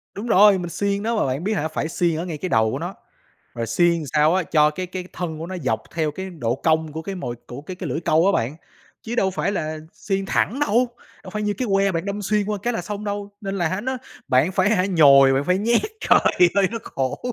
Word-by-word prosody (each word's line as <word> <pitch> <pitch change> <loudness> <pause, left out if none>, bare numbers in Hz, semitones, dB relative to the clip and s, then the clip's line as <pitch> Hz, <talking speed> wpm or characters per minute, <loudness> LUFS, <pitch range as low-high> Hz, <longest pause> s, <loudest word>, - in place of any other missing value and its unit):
Đúng 215 +4 -5
rồi, 205 -2 +6
mình 175 -1 -4
xiên 200 +2 -1
nó, 230 +1 0
mà 215 - +1
bạn 135 +4 -2
biết 215 +3 0
hả 160 -6 -1
phải 160 - -3
xiên 170 -1 0
ở 170 - -3
ngay 165 -4 -5
cái 185 +4 -4
đầu 110 -1 +2
của 135 - -3
nó, 175 +4 -5 0.6
rồi 115 -1 -3
xiên 170 +10 +3
làm 165 - -3
sao 155 +3 +4
á 190 - +2
cho 150 -1 +3
cái 185 +4 -5
cái 185 0 -6
thân 165 -3 -4
của 165 - -5
nó 185 - -5
dọc 130 - -1
theo 155 -2 0
cái 190 +5 -6
độ 120 -9 -2
cong 160 +2 0
của 160 +1 -5
cái 195 +2 -5
mồi 125 -9 -5
của 125 +3 -8
cái 180 +5 -8
cái 180 -4 -5
lưỡi 150 +6 -2
câu 160 +2 +3
á 200 - +4
bạn, 130 -2 -1 0.5
chứ 230 +1 -5
đâu 190 -4 +2
phải 195 - -1
là 155 -4 -3
xiên 195 -1 -3
thẳng 245 +7 0
đâu, 245 -1 +2 0.3
đâu - - -10
phải 210 0 -3
như 210 0 0
cái 255 - -1
que 195 0 +3
bạn 165 +1 -2
đâm 200 +1 -4
xuyên 210 +1 0
qua 210 -1 -2
cái 240 +2 0
là 180 - -3
xong 205 +3 -5
đâu, 205 0 -4
nên 195 -2 -4
là 180 +3 0
nó 260 +3 -2 0.3
bạn 135 +8 +3
phải, 190 +2 +2
hả, 195 -4 +2
nhồi, 140 -7 +6
bạn 135 +1 +1
phải 180 +1 +2
nhét. 235 +3 +2 0.2
Trời - - +5 0.4
ơi, 200 -2 +3
nó 230 - -2
khổ! 130 -1 -3
180 Hz, 265 wpm, -22 LUFS, 155-200 Hz, 0.6 s, rồi